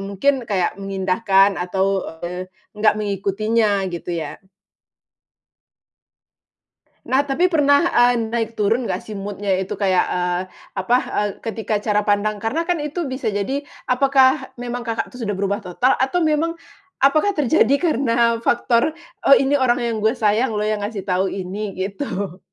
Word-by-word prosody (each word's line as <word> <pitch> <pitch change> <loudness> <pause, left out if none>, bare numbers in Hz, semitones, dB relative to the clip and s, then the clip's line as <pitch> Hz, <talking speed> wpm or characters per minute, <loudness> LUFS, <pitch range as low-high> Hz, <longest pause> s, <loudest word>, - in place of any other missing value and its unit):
mungkin 200 +8 +2 0.2
kayak 190 -1 -1
mengindahkan 195 0 +2
atau, 190 +2 0 0.4
eee, 180 +1 -5 0.2
nggak 210 0 +2
mengikutinya, 205 +1 0
gitu 175 0 -4
ya. 155 -3 -6 2.7
Nah, 275 +2 +2
tapi 340 +7 +1
pernah, 285 -3 +4
eee, 245 0 +4 0.2
naik 230 -1 -2
turun 225 +4 +1
nggak - - -3
sih 215 -2 -7
mood-nya 200 0 -4
itu, 190 0 -3
kayak, 190 -3 +2
eee, 180 0 0 0.4
apa, 215 +6 +2
eee, 210 - 0
ketika 225 -1 -3
cara 210 -1 0
pandang 205 0 +1
karena 225 +11 -1
kan 350 0 -1
itu 300 0 -3
bisa 260 +1 -5
jadi 220 +8 -2 0.2
apakah 265 0 +3
memang 245 0 -5
Kakak 230 0 -2
tuh 250 - -12
sudah 210 -4 -2
berubah 200 +1 -1
total 245 +9 +1
atau 270 +7 +1
memang 315 +1 +1 0.5
apakah 310 +9 +3
terjadi 280 -3 +3
karena 235 -7 +2
faktor, 235 +5 +1 0.3
"Oh, 275 - +9
ini 275 +2 +2
orang 245 -2 +2
yang 235 -1 -1
gue 220 +3 +2
sayang 225 0 +1
lo 210 - -1
yang 215 0 0
ngasih 210 -3 -5
tahu 185 0 0
ini." 195 +2 -4
Gitu. 195 - -4
220 Hz, 150 wpm, -21 LUFS, 195-265 Hz, 2.7 s, Oh